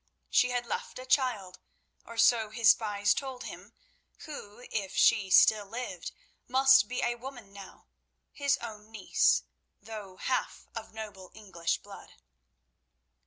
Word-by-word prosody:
She 250 - +4
had 245 -1 -1
left - - -5
a 255 - -8
child, 235 -9 0 0.5
or 230 - -11
so 230 -1 +4
his 220 +1 +5
spies 205 -2 +1
told 265 -2 -5
him, - - -9 0.5
who, 245 -6 -10
if 200 -4 -3
she 205 -4 +4
still 205 +2 +5
lived, 225 -6 -6 0.4
must 265 +1 +5
be 250 - -3
a 240 - +1
woman 240 -4 -10
now—his 230 +7 -5
own 215 -2 -8
niece, 225 - +2 0.4
though 210 -4 -9
half 255 - -2
of 225 -1 -7
noble 205 -4 -9
English 190 -6 -3
blood. - - -13
225 Hz, 130 wpm, -30 LUFS, 205-250 Hz, 0.5 s, his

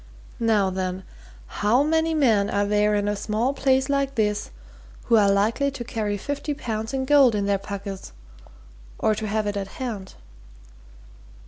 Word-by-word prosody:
Now 215 -4 +2
then 185 0 -3 0.4
how 215 - +1
many 320 +1 +1
men 220 -9 +3
are 205 0 +1
there 210 +1 +2
in 205 0 0
a 205 - 0
small 220 +6 -1
place 265 -1 +2
like 275 -1 0
this 210 -3 0 0.5
who 230 - +3
are 205 -2 +5
likely 215 +8 +2
to 275 -3 -6
carry 215 -4 -2
fifty 285 +6 -4
pounds 220 -3 -4
in 265 -1 -2
gold 270 -5 +5
in 200 -1 0
their 200 -1 +1
pockets, 200 -1 -7 0.9
or 215 - +2
to 215 0 -4
have 215 +1 -1
it 205 0 -2
at 195 -1 -3
hand?" 215 -7 -5
215 Hz, 160 wpm, -24 LUFS, 205-265 Hz, 0.9 s, are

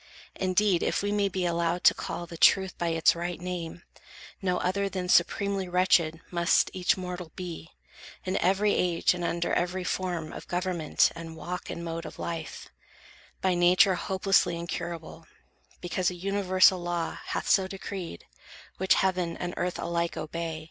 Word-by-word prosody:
Indeed, 185 -1 +2
if - - 0
we 205 - 0
may 205 -1 +1
be 185 -1 -2
allowed 170 0 0
to - - +7
call 175 - -5
The 170 - -10
truth 190 +3 +4
by 170 - 0
its 165 0 +3
right 175 0 -4
name, 175 -2 -5 0.6
no 180 -2 +1
other 195 +2 0
than 185 -1 -4
Supremely 195 0 +2
wretched 175 -3 +3
must 170 0 +3
each 185 -1 +1
mortal 180 -2 -6
be, 175 -2 -7 0.6
In 185 +1 -1
every 195 +3 +2
age, 175 -1 +2
and 175 -1 -5
under 170 0 -1
every 180 +1 0
form 175 -3 -3
Of - - -9
government, 175 -3 +1
and 165 -1 -8
walk 180 +2 -6
and 170 - -5
mode 165 0 -4
of - - -11
life; 165 -2 -5 0.7
By 185 -1 +2
nature 180 +2 +5
hopelessly 190 -1 +1
incurable, 170 -1 -6 0.5
Because 175 0 0
a 180 - -6
universal 185 0 +3
law 175 -1 -3
hath - - -3
so 190 -2 +4
Decreed, 190 - -7 0.5
which 190 +1 +3
heaven 185 -3 0
and 175 0 -4
earth 180 0 -2
alike 170 0 -2
obey. 165 0 -4
180 Hz, 160 wpm, -28 LUFS, 170-185 Hz, 0.7 s, to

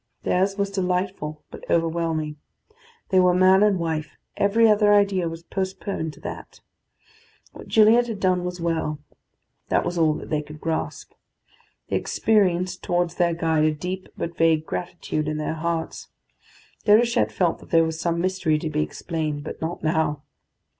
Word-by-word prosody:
Theirs 195 +2 +1
was 200 -1 -1
delightful, 180 -5 -2
but - - -10
overwhelming. 165 -2 0 0.7
They 190 - +4
were 180 -1 +4
man 185 +1 +5
and 210 -2 +4
wife: 160 -2 -3 0.2
every 225 +3 +4
other 210 -1 +4
idea 195 -4 +2
was 165 0 -8
postponed 190 -3 -4
to - - -16
that. - - -8 0.9
What - - -12
Gilliatt 225 +2 +5
had 220 -4 -5
done 185 -2 +1
was 180 0 -4
well; 165 -3 -1 0.7
that - - +2
was 175 0 -2
all 155 -2 +3
that - - -8
they 150 -1 +1
could 150 0 -11
grasp. 160 0 -3 0.8
They - - +1
experienced 185 -4 +1
towards 175 -1 0
their 175 -1 +1
guide 160 -2 +1
a 155 - +3
deep 185 +4 -5
but 170 0 -4
vague 160 -2 +2
gratitude 160 -3 -3
in 155 0 -2
their 155 +1 -2
hearts. 165 0 -3 0.8
Déruchette 230 +3 +4
felt 175 -3 0
that - - -16
there 165 -1 +5
was 160 0 -4
some 170 0 0
mystery 180 -4 +1
to 155 0 -4
be 150 0 0
explained, 155 -2 -3
but - - -8
not 160 +1 -4
now. 155 -2 0
170 Hz, 160 wpm, -24 LUFS, 160-190 Hz, 0.9 s, man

